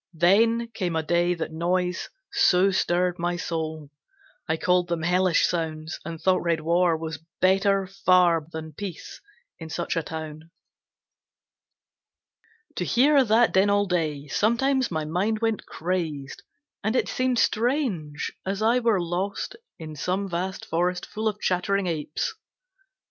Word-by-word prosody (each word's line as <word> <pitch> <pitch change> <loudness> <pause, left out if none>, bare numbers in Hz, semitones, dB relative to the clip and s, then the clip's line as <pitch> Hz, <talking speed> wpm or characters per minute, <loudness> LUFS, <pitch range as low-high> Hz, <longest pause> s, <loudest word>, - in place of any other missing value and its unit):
Then 225 +8 +3
came 180 -7 -3
a 160 - 0
day 175 +2 +2
that 165 -1 -4
noise 180 +2 -1 0.2
so 185 +2 +4
stirred 180 -1 +1
my 175 +1 0
soul, 160 -3 -4 0.6
I 160 0 0
called 180 +1 +2
them 170 -2 -2
hellish 180 +1 +3
sounds, 160 -2 -3
and 165 0 -6
thought 185 +1 +2
red 170 -2 0
war 170 +1 +2
Was 160 0 -5 0.2
better 195 +1 +3
far 185 -4 +3
than 160 -1 -7
peace 190 +1 -7 0.4
in 160 -1 -8
such 170 +2 -3
a 165 - +1
town. 160 0 -7 2.3
To - - 0
hear 275 +3 +4
that 230 0 +3
din 190 +2 +4
all 205 0 +3
day, 155 -6 -1
sometimes 255 - +1
my 155 -2 -2
mind 190 +8 0
Went 225 -1 -1
crazed, 160 -6 -3 0.4
and 215 +4 0
it - - +2
seemed 255 -1 0
strange, 220 - 0
as 195 +2 -2
I 235 +3 +4
were 230 -5 +2
lost 180 - -3 0.2
In 155 -2 -8
some 185 +7 -2
vast 185 +1 -3
forest 180 +2 -1
full 220 +1 -3
of 210 -1 -2
chattering 195 +2 0
apes. 155 -3 -2
180 Hz, 145 wpm, -25 LUFS, 160-200 Hz, 2.3 s, so